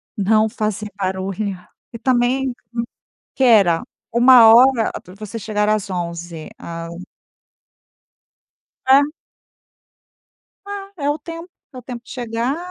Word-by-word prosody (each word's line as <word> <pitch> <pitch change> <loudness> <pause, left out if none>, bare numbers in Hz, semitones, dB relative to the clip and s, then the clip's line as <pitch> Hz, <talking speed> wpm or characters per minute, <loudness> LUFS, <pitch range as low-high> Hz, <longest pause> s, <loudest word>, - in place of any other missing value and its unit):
não 215 +2 +3
fazer 215 -2 -3
barulho, 190 +1 -3 0.3
e 230 - -7
também, 250 +2 +1 0.8
"quera", 210 -10 +4 0.3
uma 240 -1 +7
hora 250 -2 +5
para 180 - -14
você 215 +2 -8
chegará 215 -1 0
às 205 -2 -4
11, 170 -2 -5
a 165 0 -7 2.0
Hã. 270 +2 +6 1.7
Ah, 395 -1 -6
é 285 -2 -2
o 295 - 0
tempo, 330 +3 -9 0.2
é 255 - -9
o - - -9
tempo 245 -1 -8
de - - -16
chegar, 240 +2 -2
225 Hz, 115 wpm, -20 LUFS, 195-255 Hz, 2.0 s, uma